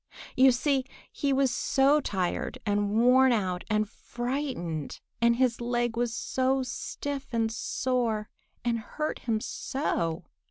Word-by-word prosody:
You 260 +1 +7
see 265 +2 +1 0.3
he 280 - -1
was 270 -1 +3
so 275 +4 +3
tired 190 +1 -2
and 205 -1 +1
worn 255 +2 +6
out 185 -6 0
and 215 0 +2
frightened, 240 - -4 0.2
and 235 0 +5
his 245 -1 +1
leg 240 -1 0
was 240 0 0
so 260 +3 0
stiff 275 +2 -5
and 225 -2 +1
sore 230 -2 -1 0.4
and 235 -1 +1
hurt 305 +7 -4
him 225 -3 -1
so! 170 - -2
240 Hz, 130 wpm, -28 LUFS, 215-265 Hz, 0.4 s, You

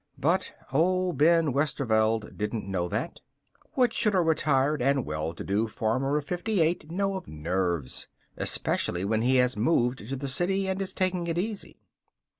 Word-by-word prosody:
But - - +1 0.2
old 180 +1 +1
Ben 165 -2 +4
Westerveld 115 -6 +1
didn't 105 -1 -3
know 90 -3 -1
that. - - -3 0.5
What 245 -4 +2
should 210 -3 +2
a 185 - +4
retired 150 -3 +2
and 135 +1 +2
well 75 +1 -3
to - - -6
do 105 +3 0
farmer 130 +7 0
of 150 - -3
fifty 185 +5 -1
eight 160 -1 +1
know 195 +3 -1
of 190 - -6
nerves, 85 -2 -2 0.3
especially 90 +2 0
when 110 +2 +1
he 130 +3 +3
has 125 0 +3
moved 125 +1 +1
to 135 - -2
the 140 +1 -4
city 190 +8 0
and 190 +1 -1
is 190 - -3
taking 185 -2 0
it 165 0 -2
easy? 205 +3 -4
140 Hz, 170 wpm, -27 LUFS, 110-175 Hz, 0.5 s, Ben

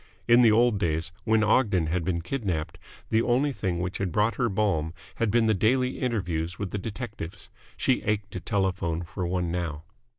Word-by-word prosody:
In 120 +1 +7
the 115 -3 +6
old 115 -1 +4
days, 80 -2 0
when 110 -1 +3
Ogden 105 -6 +3
had 85 +2 -1
been 85 -1 -1
kidnapped, 90 - -3 0.3
the 110 - +4
only 130 +4 +2
thing 90 -7 -2
which 90 +1 -3
had 95 -3 -1
brought 105 +4 +2
her 120 +2 0
balm 95 -6 0 0.2
had 115 - +1
been 115 +2 +3
the 110 - +4
daily 125 +6 +1
interviews 90 -9 -2
with 100 -2 -4
the 100 - -2
detectives. 105 -4 -7 0.3
She - - +2
ached 105 -1 -1
to 90 - -4
telephone 90 -2 -1
for 85 +1 -4
one 90 -1 -1
now. 85 -3 -3
100 Hz, 190 wpm, -27 LUFS, 85-115 Hz, 0.3 s, In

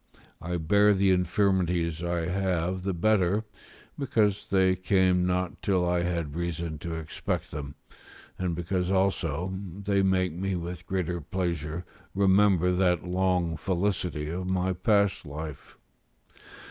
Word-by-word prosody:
I 90 +1 -2
bear 100 +6 +4
the 95 0 +3
infirmities 90 -3 +1
I 85 0 -1
have 90 0 -1
the 95 +1 -1
better, 100 +2 +2 0.6
because 110 -8 +1
they 95 -1 +3
came 95 -1 +2
not 90 -1 -1
till 90 -3 +1
I 90 0 +1
had 85 -4 -2
reason 85 -2 -3
to 85 +1 -4
expect 80 -1 -4
them, 70 -1 -6 0.6
and 90 -2 -1
because 90 +1 -1
also 95 -2 0 0.3
they 100 0 +2
make 95 -3 +2
me 95 +2 -2
with 90 0 -6
greater 90 -2 -2
pleasure 85 -1 -3 0.3
remember 95 -2 +4
that 90 -2 +1
long 90 -2 +1
felicity 90 -2 -1
of 90 +2 -3
my 95 0 +1
past 100 +2 +2
life. 75 -1 -8
90 Hz, 130 wpm, -27 LUFS, 85-95 Hz, 0.6 s, bear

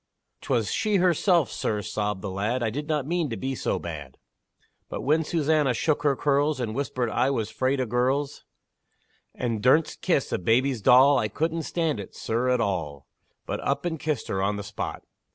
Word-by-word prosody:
"'Twas 120 -6 0
she 215 -2 0
herself, 175 - +3
sir," 105 - -1
sobbed 105 -2 -3
the 100 - -3
lad; 110 +6 -1
"I 110 - 0
did 145 +5 -4
not 150 -4 0
mean 170 -1 -1
to 115 - -4
be 135 +1 -3
so - - -1
bad; 75 -6 -7 0.7
But - - -4
when 155 +4 +2
Susannah 150 -4 +1
shook 150 +6 +1
her 145 -2 +2
curls, 145 +1 +1
And 115 -3 -2
whispered, 125 -3 -2
I 125 +5 +2
was 115 -5 -2
'fraid 130 +1 0
of 125 -3 -1
girls 130 +4 0 0.9
And 115 -4 -2
dursn't 150 +7 +3
kiss - - +1
a - - 0
baby's 120 +6 +1
doll, 130 +6 +6
I 110 - 0
couldn't 160 +9 -2
stand 160 -8 0
it, 100 - -9
sir, 120 +3 -1
at 125 -1 +2
all, 80 -10 -2 0.4
But - - -3
up - - -1
and 160 -3 -2
kissed 150 -6 -2
her 95 - -1
on 100 +2 +1
the 100 - -5
spot! 100 -1 -5
130 Hz, 190 wpm, -26 LUFS, 110-150 Hz, 0.9 s, doll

